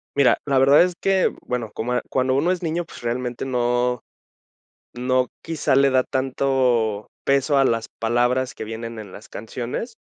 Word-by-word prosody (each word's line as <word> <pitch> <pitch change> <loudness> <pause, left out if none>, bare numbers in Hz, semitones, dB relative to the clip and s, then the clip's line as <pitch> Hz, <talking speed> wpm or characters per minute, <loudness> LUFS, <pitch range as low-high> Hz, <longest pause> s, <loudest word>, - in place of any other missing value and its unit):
Mira, 140 -2 +4
la 140 -2 +1
verdad 140 +4 +6
es 180 -1 -1
que, 195 -1 +2
bueno, 120 -3 -3
como, 125 +2 -1
cuando 130 0 +1
uno 165 +6 +2
es 180 - -2
niño, 165 +1 -1
pues, - - -12
realmente 120 +1 -3
no 125 -1 0 0.9
no 125 +1 +1
quizá 160 -4 0
le 140 +1 +5
da 130 0 +3
tanto 130 -5 0 0.2
peso 140 +1 +2
a 135 - +5
las 115 -3 +1
palabras 120 +3 +1
que - - -8
vienen 115 +1 -6
en 100 -3 -10
las 105 - -12
canciones, 120 - -5
130 Hz, 165 wpm, -22 LUFS, 120-140 Hz, 0.9 s, verdad